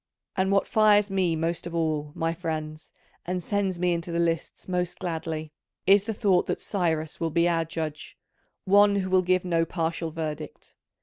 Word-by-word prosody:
And 190 0 +1
what 195 0 +2
fires 210 -2 +4
me 185 -4 +1
most 165 +2 -2
of 170 - -6
all, 155 -3 -1
my 165 0 0
friends, 155 -2 -5 0.3
and 180 0 -3
sends 200 -2 -1
me 180 0 +1
into 170 0 -4
the 170 - -1
lists 165 -1 -1
most 180 -1 -1
gladly, 160 -2 -4 0.3
is 200 +1 +5
the 225 - -2
thought 195 -5 +2
that - - -1
Cyrus 160 -5 -1
will 165 - 0
be 170 +2 +2
our 165 -1 +1
judge: 155 -2 -5 0.5
one 205 +1 +5
who 190 -2 -1
will 185 -1 +5
give 185 0 +1
no 165 -2 +2
partial 165 -1 -2
verdict. 155 -2 -6
170 Hz, 180 wpm, -26 LUFS, 160-185 Hz, 0.5 s, is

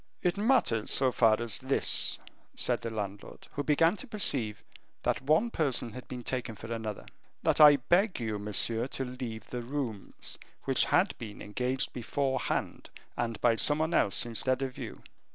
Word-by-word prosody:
"It 175 -1 +2
matters 205 - +2
so 130 -1 +4
far 110 -3 +3
as 115 -2 -2
this," 130 +1 +3 0.4
said - - 0
the 115 - -4
landlord, 105 -2 -7
who 145 - -3
began 165 +5 +3
to - - -8
perceive 125 - 0 0.4
that - - 0
one 155 - +2
person 135 - -1
had 125 +3 -10
been 125 -1 -7
taken 120 -2 -3
for 110 +2 -7
another, 110 -2 -5 0.4
"that - - +3
I 150 -1 +10
beg 175 - +1
you, 110 -3 -3
monsieur, 110 +3 -1
to 135 0 -4
leave 125 -4 -7
the 125 - -3
rooms, 120 -5 -5 0.2
which - - +3
had - - +2
been 110 -3 -8
engaged 125 +5 0
beforehand, 130 +2 -2 0.3
and 115 -2 -3
by 115 -2 +3
some 145 +5 +4
one 160 +2 -1
else 100 - +3
instead 125 +3 0
of 130 -1 -4
you." - - -8
125 Hz, 170 wpm, -30 LUFS, 115-145 Hz, 0.4 s, I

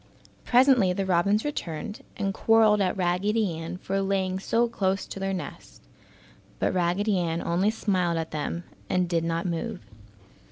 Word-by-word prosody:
Presently 245 -7 +5
the 195 +1 -2
robins 190 +5 +2
returned 205 - -4 0.2
and 195 -2 -1
quarreled 220 0 +4
at 190 0 0
Raggedy 190 +2 +1
Ann 165 +2 -5
for 195 +1 -2
laying 190 -1 0
so 235 +4 +1
close 195 -4 -1
to - - -8
their 195 0 -1
nest, 185 -2 -7 0.7
but - - 0
Raggedy 185 +3 +1
Ann 165 -1 -1
only 175 +5 +1
smiled 185 -6 0
at 160 -1 -3
them 155 +3 -3 0.3
and 180 -1 +1
did 170 -1 0
not 165 +1 -1
move. 180 +4 -3
190 Hz, 155 wpm, -26 LUFS, 175-210 Hz, 0.7 s, Presently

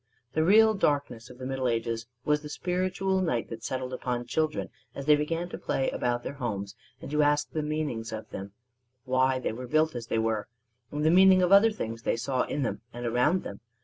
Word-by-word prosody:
The 155 - +2
real 220 +5 +6
darkness 140 - -1
of 125 - -12
the 130 - -7
Middle 130 -1 -1
Ages 115 -1 -1 0.2
was 150 0 +2
the 150 - -8
spiritual 185 +3 -1
night 125 -12 -1
that 115 -1 -7
settled 130 -1 -3
upon 125 -1 -3
children 155 +4 -1 0.2
as 140 - -6
they 150 0 +6
began 165 +4 -2
to - - -7
play 135 - -1
about 120 0 -1
their - - -4
homes 105 -7 -4 0.3
and - - -7
to 150 0 +2
ask 145 0 +2
the 155 - -1
meanings 150 -7 -3
of 110 0 -6
them 100 +1 -6 0.5
why 130 0 +2
they 130 - -2
were 125 +2 -7
built 155 +3 +2
as 120 -2 -6
they 115 - -1
were 110 -1 0 0.4
and 150 +1 -2
the 160 - +5
meaning 185 +1 +7
of 180 - +2
other 200 +3 +8
things 115 - -5
they 115 - 0
saw 130 +2 0
in 145 - -2
them 125 - -3
and 120 +1 -6
around 125 +10 +2
them. 100 - -7
135 Hz, 215 wpm, -28 LUFS, 120-155 Hz, 0.5 s, other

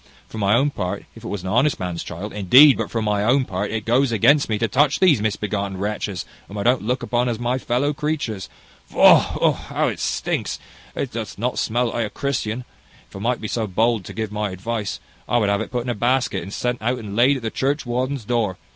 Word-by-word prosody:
For 110 - -8
my 100 +1 +3
own 140 +4 +2
part, 100 -3 -4
if 115 - -14
it - - -6
was 100 -3 -4
an 95 - -4
honest 125 +8 +2
man's 90 -2 -3
child, 95 +5 -7
indeed 130 +9 +7
but - - -3
for 115 -2 -2
my 105 -1 0
own 130 +4 +3
part, 100 0 -3
it 110 -1 -3
goes 125 +2 +2
against 140 +6 +4
me 110 - +1
to 115 - 0
touch 140 +6 +2
these 160 - +4
misbegotten 100 -2 -2
wretches, 100 -1 -3 0.2
whom 100 - -8
I 100 - -2
don't 125 +2 +3
look 125 +5 -2
upon 125 0 0
as 115 - -2
my 120 +2 -1
fellow 130 +4 0
creatures. 140 -10 -3 0.4
Faugh! - - +5
how - - 0
it - - -6
stinks! - - -2 0.4
It - - -3
doth - - -5
not - - -1
smell 120 +2 0
like 115 -1 -1
a - - -10
Christian. 120 -1 -3 0.5
If - - -14
I - - -6
might 120 +4 -1
be 110 - -3
so 110 0 -2
bold 110 +2 +1
to - - -8
give 110 -2 -4
my 105 0 -2
advice, 100 - -4 0.3
I 120 - +3
would 105 -4 +2
have 100 +1 +1
it - - -5
put 125 -1 -2
in 125 - -5
a - - -1
basket, 125 +4 0
and 95 - -8
sent 125 +3 -2
out 125 +3 0
and 105 -4 -7
laid 130 +5 +4
at 125 - -9
the 110 - -2
churchwarden's 130 -2 -1
door. 110 -5 0
115 Hz, 235 wpm, -22 LUFS, 105-125 Hz, 0.5 s, indeed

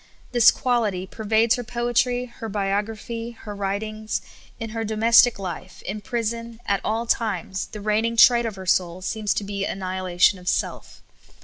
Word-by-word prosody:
This 240 -2 +7
quality 220 -7 0
per 220 +3 -9
vades 220 +2 +3
her 245 - -4
poetr}^ 245 +1 0
her 225 -2 -8
biograph}', 215 +3 -3
her 210 - -7
writings; 215 +2 -3 0.4
in 225 -2 -5
her 225 0 -3
domestic 225 +2 +5
life, 185 -1 -7
in 210 +3 -5
prison, 230 +1 -3
at 200 -1 0
all 225 +2 -1
times, 195 -5 -1
the 210 - -9
reigning 220 +2 0
trait 235 0 +6
of 215 - -5
her 190 -1 -8
soul 180 0 +1
seems 215 0 -1
to - - -1
be 200 0 -3
annihilation 185 -1 +1
of 180 - -14
self. - - -3
215 Hz, 165 wpm, -24 LUFS, 195-230 Hz, 0.4 s, This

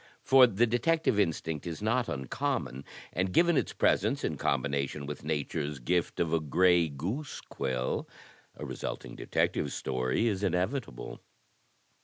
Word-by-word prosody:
For 130 -1 +7
the 115 +1 +2
detective 120 +1 +1
instinct 80 -4 -1
is 80 -2 -4
not 115 +3 0
uncommon, 65 0 -3 0.3
and 90 +1 0
given 170 - +4
its - - +1
presence - - +1
in - - -1
combination 70 +1 -1
with 75 0 -6
Nature's 75 -1 -2
gift 85 +7 -1
of 85 -1 +1
a 85 - +3
gray 85 +2 +3
goose 95 - -4
quill, 65 -1 -3 0.5
a - - -6
resulting - - -5
Detective - - 0
Story 65 - -1
is 100 -4 0
inevitable. 95 - -2
85 Hz, 135 wpm, -30 LUFS, 70-110 Hz, 0.5 s, For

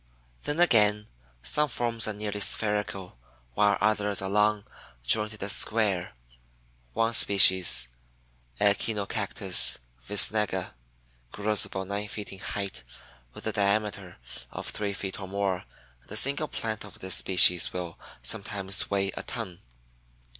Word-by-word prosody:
Then 145 +3 -3
again 105 -10 +4 0.4
some 150 0 0
forms 115 -2 -2
are 110 - -3
nearly 105 0 -6
spherical, 100 - 0 0.3
while 105 +7 +1
others 105 -1 0
are 95 - -4
long, 105 0 +1 0.4
jointed, 105 - +1
and 100 - 0
square, 100 -6 0 0.8
one 115 +1 -1
species 95 - +6 0.7
(Echinocactus 100 -1 +2 0.2
visnaga) 105 - 0 0.6
grows 105 0 -1
about 95 0 -7
nine 100 +1 -4
feet 105 0 -8
in 95 - -12
height 100 -6 -6 0.5
with - - -11
a 110 - -2
diameter 100 -2 -2 0.3
of - - -7
three 100 -1 -4
feet 95 +1 -6
or 95 - -8
more 95 -1 -3 0.4
and - - -23
a - - -6
single 140 +6 +2
plant 110 -4 -6
of 105 - -14
this 95 0 -2
species 90 -2 +6
will 90 -2 -7 0.2
sometimes 100 +6 0
weigh 100 -1 -1
a - - -5
ton. 95 -8 -7
105 Hz, 130 wpm, -26 LUFS, 95-105 Hz, 0.8 s, species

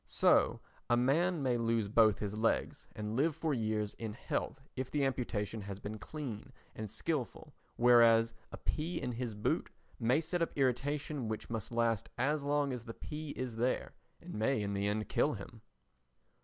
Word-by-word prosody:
So - - +4 0.3
a 120 - +5
man 155 +6 +2
may 125 -2 +2
lose 115 -2 +1
both 110 -1 +5
his 105 0 -3
legs 110 +1 0
and 105 +1 -3
live 150 +4 +2
for 160 -2 0
years 110 -3 -1
in 110 -2 -5
health 125 - -3 0.2
if 130 0 -3
the 145 -2 +1
amputation 115 -5 -2
has 100 -1 -6
been 105 +1 -6
clean 130 -8 -6 0.2
and 110 -1 -5
skilful, 130 +4 -3 0.2
whereas 115 -1 +6 0.2
a - - -6
pea 160 +3 -2
in 125 -3 -2
his 120 -2 -3
boot 105 - 0 0.3
may 125 +5 +3
set 170 +2 -2
up 165 - -1
irritation 140 +1 0
which 110 +1 -4
must 110 -2 -3
last 115 -3 +1
as 145 +4 +1
long 145 -1 +1
as 120 -2 -6
the 115 - -7
pea 155 0 -6
is 125 -3 -3
there 125 +3 0 0.3
and - - -9
may 110 +2 +1
in 100 0 -2
the 100 0 0
end 105 +1 -1
kill - - +2
him. - - -9
120 Hz, 180 wpm, -34 LUFS, 110-140 Hz, 0.3 s, whereas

